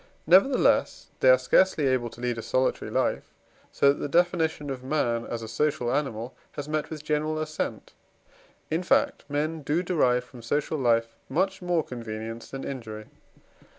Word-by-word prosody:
Nevertheless 195 - +4
they - - +5
are - - +8
scarcely 190 - +3
able 130 -3 +1
to 120 - -13
lead 120 -1 -1
a - - -3
solitary 130 +3 0
life, - - -1 0.4
so 140 0 +4
that - - -10
the - - -2
definition 160 -3 +1
of 130 -1 -6
man 120 -5 0
as 115 -1 -4
a - - -6
social 120 +1 0
animal 130 -4 -2 0.2
has 145 0 -6
met 155 0 -2
with 155 -2 -7
general 155 +1 0
assent; 155 0 -4 0.8
in 160 +3 +1
fact, 180 - +2
men 155 +2 -1
do 150 +5 0
derive 130 -9 +2
from 125 -1 -13
social 145 +6 -1
life 115 -2 +1
much 190 +6 0
more 175 -3 +1
convenience 115 -2 -7
than 135 0 -6
injury. 110 -5 -7
140 Hz, 165 wpm, -27 LUFS, 120-155 Hz, 0.8 s, are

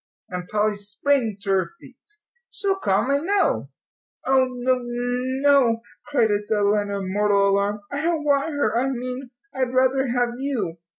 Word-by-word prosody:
And 180 -1 -5
Polly 210 0 0
sprang 215 +2 0
to 200 - -5
her 190 -1 +1
feet. - - -15 0.5
"She'll 390 -1 -1
come, 200 - +1
I 280 - +3
know." 390 +5 0 0.6
"Oh, 265 -1 +3
no 255 0 0
no," 245 +1 +1 0.3
cried 235 -7 +2
Adela, 205 0 +1
in 200 -2 -4
mortal 205 -1 +3
alarm. 200 +1 0
"I 285 0 -2
don't 325 -1 0
want 285 +1 +2
her 285 -6 0
I 270 - 0
mean 255 0 -5 0.2
I'd 260 -1 -2
rather 260 +1 +3
have 245 0 0
you. 220 -12 -2
245 Hz, 155 wpm, -23 LUFS, 205-270 Hz, 0.6 s, I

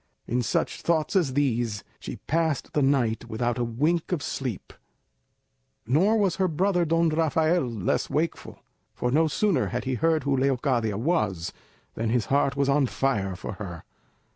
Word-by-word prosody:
In 125 +2 0
such 115 - -1
thoughts 160 0 0
as 165 -9 +2
these 120 -7 0 0.2
she - - -6
passed 160 -3 0
the 150 - +2
night 130 -5 +1
without 120 +2 -1
a - - +1
wink 150 +10 0
of 165 -5 -1
sleep; 125 -8 -4 1.1
nor 180 - +3
was 195 -5 +1
her 190 -1 +2
brother 180 +2 +1
Don 165 +1 +2
Rafael 160 0 +2
less 110 -6 -1
wakeful; 155 +4 -2 0.4
for 125 - -1
no 160 +4 +3
sooner 165 - +1
had 125 - -3
he 130 - -2
heard 160 +3 +1
who 140 0 +1
Leocadia 130 -5 +1
was, 110 - 0 0.4
than 115 0 -2
his 115 -2 +1
heart 140 -1 +2
was 140 -1 +1
on 140 -1 +3
fire 105 -9 -1
for 90 - -6
her. 85 -5 -6
140 Hz, 165 wpm, -26 LUFS, 120-160 Hz, 1.1 s, nor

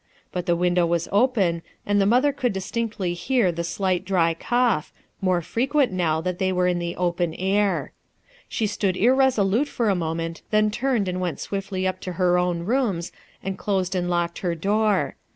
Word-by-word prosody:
But 180 0 -4
the 175 - +3
window 175 0 +2
was 170 0 0
open 200 -7 +2 0.2
and 205 0 +2
the 195 - +3
mother 255 +6 +3
could 255 -5 -1
distinctly 195 -1 -2
hear 190 +3 +1
the 170 0 -4
fclight 185 +1 -1
dry 180 -3 +2
c0U 240 +5 +2
S 150 - -14
h - - -31 0.3
more 185 -2 +2
h(if 235 +10 -1
\ 285 - -17
utni 280 -6 +3
now 170 -4 +1
that 180 +1 -3
Ihc 190 - +1
y - - +1
were 180 0 +1
in 180 -1 +1
the 170 0 -3
open 175 -2 -1
air. 195 +2 0 0.6
She 220 - -1
stood 200 -3 -1
irresolute 250 0 +3
/or 230 -6 0
a - - +1
moment, 165 -1 -3
then 215 0 +3
turned 240 -3 0
and 180 0 -2
went 175 -3 -2
swiftly 195 -1 -3
up 185 0 -1
to 185 - -5
her 180 0 +2
own 180 -1 0
rooms 205 -4 0 0.3
and 195 0 -4
closed 190 -2 -1
and 175 -1 -1
locked 175 -1 -1
her 175 -2 -1
door. 205 +3 +1
185 Hz, 205 wpm, -24 LUFS, 175-215 Hz, 0.6 s, the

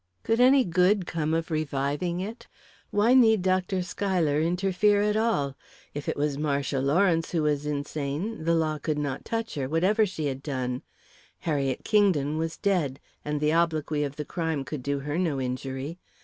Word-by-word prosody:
Could 225 +1 +1
any 260 +1 +6
good 180 +1 +2
come 155 -2 -2
of 165 +1 -1
reviving 155 +3 -1
it? 220 +5 -7 0.4
Why 210 +4 +3
need 220 -6 +5
Dr. 185 0 +1
Schuyler 175 -6 0
interfere 190 +4 +2
at 210 0 +1
all? 215 -12 +1 0.4
If 145 0 -4
it - - -2
was 145 -1 -1
Marcia 140 -2 0
Lawrence 165 +5 +2
who 165 -3 +1
was 150 -1 0
insane, 150 +6 -3
the 170 +1 +2
law 155 -2 0
could 155 0 -2
not 140 -3 -3
touch 225 0 -3
her, 135 -3 -3
whatever 195 +7 +3
she 160 -5 -4
had 135 -1 -3
done. 130 -3 -3 0.6
Harriet 140 -5 -1
Kingdon 160 -9 +2
was 165 0 -3
dead, 170 -10 0 0.2
and 150 0 -2
the 150 +1 +2
obloquy 155 -3 +1
of 140 -1 -4
the 150 - -5
crime 160 -4 -2
could 150 -1 -5
do 140 +1 -2
her 150 +4 -2
no 160 -7 0
injury. 130 +5 -4
160 Hz, 175 wpm, -27 LUFS, 145-185 Hz, 0.6 s, any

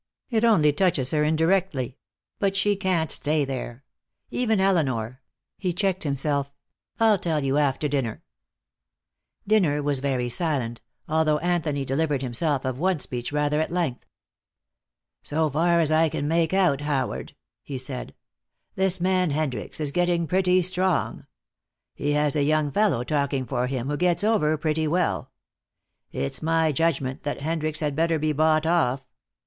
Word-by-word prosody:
It 225 -1 +1
only 160 -11 +4
touches 145 -7 +1
her 150 -1 +2
indirectly. 160 -4 +1 0.4
But 195 -1 +1
she 205 +1 +2
can't 185 -5 0
stay 150 0 +1
there. 130 -1 -6 0.5
Even 225 -4 +1
Elinor 130 - 0 0.2
" 130 - -62
he 180 -3 -1
checked 190 -1 -1
himself. 140 0 -1 0.5
"I'll 220 -3 +4
tell 160 -4 -1
you 135 +2 +1
after 145 +1 +1
dinner." 135 -6 -2 1.2
Dinner 170 -9 +2
was 145 -2 +1
very 130 -3 -1
silent, 120 -4 -1 0.3
although 155 -1 +2
Anthony 160 -4 -1
delivered 140 0 0
himself 135 +3 -1
of 130 0 -3
one 185 +1 +1
speech 125 -3 -5
rather 150 +1 +1
at 160 - -2
length. 170 -8 -2 1.1
"So 155 +2 0
far 170 +4 +2
as 160 -2 +2
I 160 +1 +4
can 145 0 -3
make 165 0 +1
out, 180 -8 +2
Howard," 145 -3 -2 0.3
he 135 - -6
said, 130 0 -5 0.6
"this 190 -1 0
man 185 -1 +2
Hendricks 145 -2 -3
is 150 -2 -1
getting 175 0 +1
pretty 185 +2 +2
strong. 185 0 0 0.7
He 145 +1 -1
has 150 -1 +2
a 150 - +2
young 150 0 +1
fellow 175 - +2
talking 140 -1 -1
for 125 -1 -1
him 130 -1 -3
who 145 +1 -1
gets 175 +2 +1
over 180 -8 +2
pretty 155 +1 0
well. 175 +2 0 0.8
It's 70 - -4
my 160 0 +2
judgment 140 -3 -1
that 145 -1 -4
Hendricks 155 0 -2
had 145 -2 -1
better 165 +1 +1
be 155 0 0
bought 155 +1 +2
off. 140 -6 +1
155 Hz, 155 wpm, -25 LUFS, 140-175 Hz, 1.2 s, only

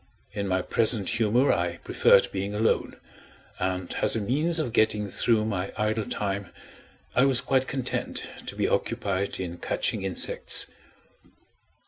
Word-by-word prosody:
In 100 -1 -3
my 95 -1 0
present 110 -3 +1
humor, 115 +4 +3
I 85 0 -1
preferred - - +4
being 100 +2 -3
alone 110 +2 0 0.6
and, 90 -1 -2
as - - +3
a - - 0
means 150 +11 +1
of 150 -8 -2
getting 105 -2 +2
through 110 +1 +1
my 100 -3 -2
idle 105 0 -1
time, 100 -2 -3 0.7
I 125 - +5
was 135 -2 +5
quite 130 0 +1
content 130 -2 -3 0.2
to - - -6
be - - 0
occupied 100 0 -1
in 85 -2 -5
catching 115 -5 -1
insects. 95 -1 +1
105 Hz, 140 wpm, -26 LUFS, 95-120 Hz, 0.7 s, I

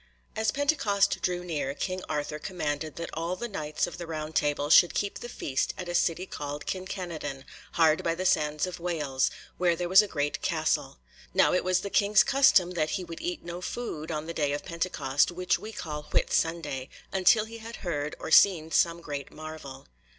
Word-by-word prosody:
As 220 0 +1
Pentecost 275 -9 +2
drew 180 -1 -1
near 145 -5 -3
King 185 +4 -3
Arthur 150 0 -2
commanded 155 -3 -3
that 170 - -5
all 165 +3 -2
the 240 +5 -4
Knights 155 -8 -2
of 175 0 -8
the 170 - -6
Round 155 -1 -5
Table 145 0 +1
should 175 - +7
keep 200 -1 -1
the 240 - -7
feast 135 - -2
at 180 - -5
a 175 - -3
city 175 +1 +1
called 145 -4 -6
Kin 185 0 -3
Kenadon, 155 -8 -5 0.3
hard 160 -2 +4
by 165 - 0
the 185 +2 -4
sands 150 -2 +2
of 180 -1 -6
Wales, 150 -6 0 0.3
where 175 -1 +3
there 175 +1 -2
was 190 +3 +8
a 210 - -3
great 145 -5 -2
castle. - - 0 0.4
Now - - +5
it 180 - +2
was 185 0 +2
the 200 - -5
King's 205 0 +5
custom 265 -10 +4
that 155 -3 0
he 185 - -5
would 170 -1 -8
eat 350 - -4
no 175 +1 -6
food 180 -7 -5
on 155 -1 -3
the 170 - -5
day 145 -3 0
of 145 - -4
Pentecost, 160 -6 0
which 180 +1 0
we 215 - -7
call 150 -7 -6
Whit - - +1
Sunday, 150 -5 -1 0.2
until 195 +3 +4
he 230 +1 -10
had 225 +1 -8
heard 150 -3 -2
or - - -6
seen 160 -3 +6
some 170 +1 +2
great 145 -4 -6
marvel. 155 -4 -9
170 Hz, 200 wpm, -28 LUFS, 150-185 Hz, 0.4 s, was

